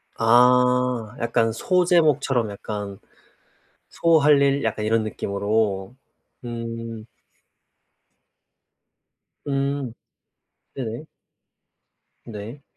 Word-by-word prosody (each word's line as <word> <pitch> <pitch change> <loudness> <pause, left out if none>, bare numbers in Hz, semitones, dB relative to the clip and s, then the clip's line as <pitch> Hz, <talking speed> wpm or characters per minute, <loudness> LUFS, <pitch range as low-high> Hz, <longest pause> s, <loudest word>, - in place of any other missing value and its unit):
아 125 0 +3
약간 115 -1 +1
소제목처럼 155 - +2
약간 100 -1 -6 0.9
소할 150 -4 +4
일 140 0 +2
약간 105 -1 -2
이런 110 0 +2
느낌으로. 100 0 -2 0.5
음. 115 -1 -6 2.4
음. 140 -3 -2 0.8
네네. 120 +2 -5 1.2
네. 115 +5 -9
115 Hz, 120 characters per minute, -23 LUFS, 110-135 Hz, 2.4 s, 소할